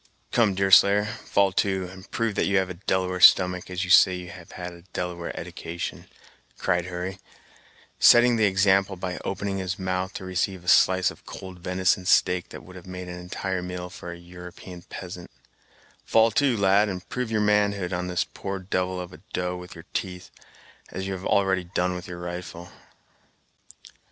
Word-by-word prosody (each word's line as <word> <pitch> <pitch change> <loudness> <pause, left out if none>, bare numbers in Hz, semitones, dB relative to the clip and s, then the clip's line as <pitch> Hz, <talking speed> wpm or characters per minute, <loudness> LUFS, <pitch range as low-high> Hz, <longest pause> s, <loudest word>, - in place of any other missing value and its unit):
"Come, 110 -5 +3
Deerslayer, 100 +1 +5
fall 100 -2 0
to, 95 -1 0
and 95 0 -13
prove 115 -2 -1
that - - 0
you 100 0 +2
have 95 -1 0
a - - -4
Delaware 90 0 -1
stomach, 90 0 +6
as 90 +1 -2
you 90 - -2
say 90 0 +7
you 90 -1 -7
have 85 -2 -12
had 90 -1 -6
a 85 - -14
Delaware 90 -1 -4
edication," 85 +1 -6 0.5
cried 90 -1 0
Hurry, 90 +2 -5 0.8
setting 120 0 +7
the 110 -1 +3
example 95 0 +3
by 90 0 -5
opening 100 0 -3
his 95 0 -3
mouth 95 -1 -2
to 95 - -6
receive 95 0 -2
a - - -16
slice 95 0 +4
of - - -17
cold 95 -1 -9
venison 90 +1 0
steak 90 -2 +3
that - - -10
would 90 - -14
have 90 0 -12
made 90 0 -7
an 90 0 -7
entire 95 +1 -3
meal 90 0 -6
for 90 -1 -8
a 85 - -8
European 90 +1 -11
peasant; 90 0 -9 0.7
"fall 115 0 +4
to, 130 0 +2
lad, 100 +1 +4
and 90 -2 -6
prove 125 -2 -3
your 110 -1 0
manhood 100 -3 +1
on 90 0 -2
this 90 0 0
poor 100 0 -6
devil 90 -1 -2
of 90 0 -7
a 75 - -13
doe 90 0 -1
with 90 0 -10
your 85 0 -12
teeth, 90 -1 -4 0.6
as 95 +1 -5
you've 95 -1 -4
already 95 -2 +2
done 90 +1 -1
with 90 0 -7
your 90 -1 -7
rifle." 85 0 -7
90 Hz, 180 wpm, -25 LUFS, 90-95 Hz, 0.8 s, say